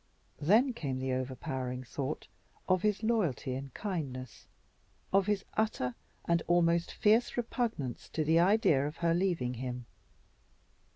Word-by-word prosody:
Then 225 - +4
came 140 - -3
the 130 0 -1
overpowering 130 0 -3
thought 135 +3 -4 0.4
of 185 -1 +3
his 210 +1 +1
loyalty 190 - +1
and 135 +1 -5
kindness, 140 - -5 0.7
of 195 0 +4
his 205 -2 0
utter 210 - 0 0.3
and 170 0 +2
almost 170 0 +3
fierce 225 +4 +3
repugnance 230 - -2
to 155 - +1
the 160 +2 +4
idea 175 -7 +4
of 150 - -7
her 165 - +4
leaving 170 -9 0
him. 125 0 -5
165 Hz, 130 wpm, -32 LUFS, 130-200 Hz, 0.7 s, Then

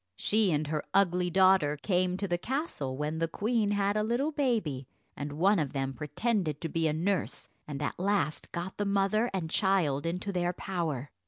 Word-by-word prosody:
She 210 - +2
and 150 0 +1
her 150 0 -2
ugly 180 -2 +3
daughter 185 -5 +4
came 180 +1 +1
to 200 - -2
the 175 -1 0
castle 235 - -3
when 150 +2 -2
the 165 - +1
queen 215 +4 0
had 205 0 +1
a 215 - +2
little 240 +8 0
baby, 215 - -1 0.3
and 145 0 -5
one 190 +6 +3
of 145 -4 -2
them 135 -1 -2
pretended 160 - -1
to 165 - -3
be 165 +1 +1
a - - +2
nurse, 180 +5 -1 0.2
and 145 -1 -4
at 145 - -3
last 190 -6 0
got 175 +2 -5
the 205 - -1
mother 200 +4 +2
and 185 -4 -2
child 165 -6 +1
into 180 +4 -2
their 175 -1 0
power. 160 -9 -3
180 Hz, 190 wpm, -30 LUFS, 150-200 Hz, 0.3 s, daughter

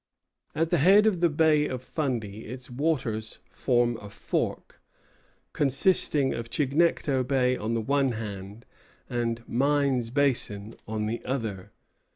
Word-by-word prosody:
At 165 +1 0
the - - +3
head 195 +8 +6
of 205 -5 +2
the 170 0 +3
Bay 150 -1 +3
of 130 -1 -5
Fundy 120 -9 -3
its 125 +2 -8
waters 120 -6 -2
form 120 -2 +1
a 105 - -9
fork, - - -3 0.7
consisting 140 0 +3
of 115 -1 -5
Chignecto 140 -1 +1
Bay 125 -1 +1
on 115 0 -2
the 115 - 0
one 135 +1 +1
hand, 105 0 -7 0.4
and 120 -1 -3
Mines 135 -2 +1
Basin 115 -6 0
on 110 0 -2
the 115 +2 -3
other. 110 -8 -4
125 Hz, 135 wpm, -27 LUFS, 115-145 Hz, 0.7 s, head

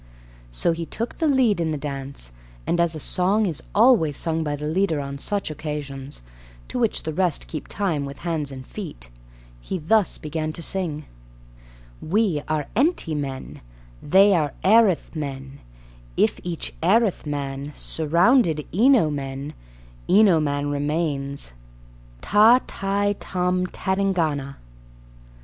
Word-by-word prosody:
So - - +1
he 165 0 -4
took 230 +2 -4
the 325 - +2
lead 250 - +3
in 165 - 0
the 155 - -2
dance, 135 - -4 0.3
and, 175 - 0
as 170 -1 +2
a - - -5
song 195 +7 +2
is 165 -7 -3
always 205 - +4
sung 160 -1 -1
by 150 -1 -2
the 150 +1 -6
leader 165 0 +1
on 140 0 -5
such 200 +1 -2
occasions, 145 - -6 0.5
to - - -3
which 230 -3 +1
the 160 - -3
rest 180 -3 0
keep 155 - -6
time 180 -8 -1
with 140 -1 -7
hands 155 -5 -2
and 130 -1 -8
feet, - - -8 0.5
he 185 - -4
thus 195 +5 +2
began 155 +1 -4
to 170 - -7
sing: 160 -6 -2 1.0
We 190 -3 +1
are 155 -2 -1
enty 260 - +1
men, 135 -2 -5 0.4
They 195 +5 +5
are 150 -6 +1
erith 200 -4 +4
men: 135 -2 -6 0.6
If - - +2
each 170 -2 -4
erith 200 0 +2
man 140 0 -4
Surround 170 - +3 0.3
eno 225 - +4
men, 140 0 -5 0.6
Eno 195 -4 +6
man 145 -1 -1
remains. 145 - -2 0.7
Tâ, 220 +4 +6
tai, 200 +1 -1
tôm, 180 0 -1
tadingana. 170 -9 -1
160 Hz, 135 wpm, -23 LUFS, 145-195 Hz, 1.0 s, Eno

